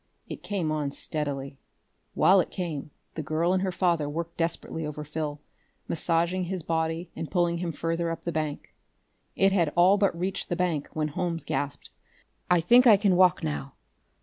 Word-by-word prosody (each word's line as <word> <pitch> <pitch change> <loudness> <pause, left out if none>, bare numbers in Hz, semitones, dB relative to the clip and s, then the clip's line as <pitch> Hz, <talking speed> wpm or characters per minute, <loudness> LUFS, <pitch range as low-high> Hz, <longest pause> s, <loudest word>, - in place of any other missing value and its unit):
It - - -7
came 185 -7 -2
on 150 -2 -1
steadily. 140 -3 -4 0.6
While 190 +1 +6
it - - 0
came, 165 -7 -4 0.2
the 160 - -4
girl 155 +4 0
and 190 - +1
her 190 -1 0
father 170 -5 +1
worked 170 +2 -4
desperately 165 -1 -2
over 150 0 -5
Phil, 150 -1 -4 0.5
massaging 170 +2 0
his 180 -1 -4
body 160 +2 -2
and 165 - -5
pulling 175 -2 +1
him 175 -1 -2
further 165 +2 -2
up 165 - -5
the 170 - -2
bank. 155 -2 -4 0.6
It 195 0 +4
had 170 -6 +2
all 185 +4 +5
but 200 -4 +2
reached 185 +3 -3
the 175 - 0
bank 170 -5 -1
when 155 -1 -1
Holmes 165 +2 -2
gasped: 140 -1 -3 0.6
"I 175 -2 +4
think 245 +9 +6
I 215 -3 +8
can 195 -2 +3
walk 180 0 +4
now. 75 -2 -3
170 Hz, 175 wpm, -27 LUFS, 155-180 Hz, 0.6 s, I